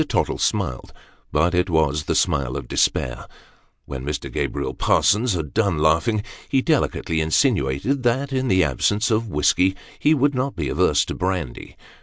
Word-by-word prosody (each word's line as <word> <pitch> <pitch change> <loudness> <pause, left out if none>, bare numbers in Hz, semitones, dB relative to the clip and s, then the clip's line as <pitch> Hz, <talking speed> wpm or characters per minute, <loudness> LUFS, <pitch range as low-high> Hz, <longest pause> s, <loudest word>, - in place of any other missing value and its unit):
Tottle - - -1
smiled 65 -1 -2 0.4
but 80 +4 +2
it 90 +1 +1
was 75 -2 +1
the - - -1
smile 65 -1 0
of 70 - -7
despair. 60 - -1 0.6
When 65 -2 -6
Mr. 75 +2 -4
Gabriel - - -2
Parsons 110 +3 +2
had 80 -5 -4
done 100 -7 +1
laughing, 85 +8 +2 0.3
he 135 -1 +2
delicately 130 - 0
insinuated 80 - +1
that, 130 +3 0
in 130 0 0
the 95 -4 +3
absence 105 - 0
of 110 +1 +1
whiskey, 95 +3 +2 0.2
he 155 +1 +3
would 145 +1 +2
not 130 +1 -2
be 75 -6 -3
averse - - +2
to - - -5
brandy. 90 -8 -4
90 Hz, 160 wpm, -22 LUFS, 75-120 Hz, 0.6 s, the